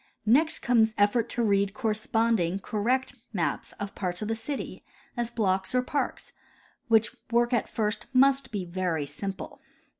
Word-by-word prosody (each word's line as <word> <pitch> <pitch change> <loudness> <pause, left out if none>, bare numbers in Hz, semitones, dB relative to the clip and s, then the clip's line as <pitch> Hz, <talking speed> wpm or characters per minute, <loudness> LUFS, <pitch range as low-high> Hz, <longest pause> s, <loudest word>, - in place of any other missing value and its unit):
Next 300 +9 +3
comes 225 -3 +3
effort 220 +3 +3
to 240 - -1
read 200 -1 +2
corresponding, 220 -5 +1
correct 235 +7 -1 0.2
maps 175 -5 -1
of 200 -1 -6
parts 180 0 -2
of 210 - -3
the - - +1
city, 270 +5 -5 0.3
as 240 -2 -1
blocks 195 -3 0
or 250 - +3
parks, 285 +2 -3 0.5
which 225 -1 +3
work 240 +1 +2
at 235 - +1
first 215 -1 -2
must 270 -1 +4
be 200 -4 -3
very 170 -4 -1
simple. 190 +7 -6
220 Hz, 150 wpm, -28 LUFS, 195-240 Hz, 0.5 s, must